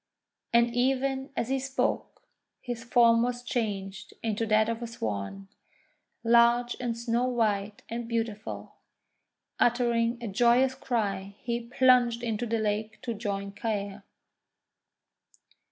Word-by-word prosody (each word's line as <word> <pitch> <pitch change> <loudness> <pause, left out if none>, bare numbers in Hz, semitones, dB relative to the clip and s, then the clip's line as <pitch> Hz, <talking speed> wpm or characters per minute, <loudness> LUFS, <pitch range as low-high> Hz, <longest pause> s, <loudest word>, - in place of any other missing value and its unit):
And 235 0 +4
even 265 +2 +1
as 235 - -1
he 270 0 +1
spoke, 270 0 -2 0.4
his 240 -2 -5
form 235 -1 +5
was 245 0 -1
changed 195 -5 -3
into 225 0 -1
that 215 0 +4
of 230 0 -2
a 235 - -3
Swan, 110 - -4 0.8
large 235 +1 +4
and 240 -2 -2
snow 235 +1 0
white 215 -4 0
and 235 0 -4
beautiful. 225 -2 -4 0.8
Uttering 235 -1 +2
a 235 - -5
joyous 240 +5 +3
cry 200 -6 -2
he 235 -1 -1
plunged 245 -2 +4
into 230 0 -2
the 230 +1 0
lake 215 0 -2
to 240 -2 -2
join 200 -2 -3
Caer. 205 -1 -3
230 Hz, 120 wpm, -28 LUFS, 215-245 Hz, 0.8 s, form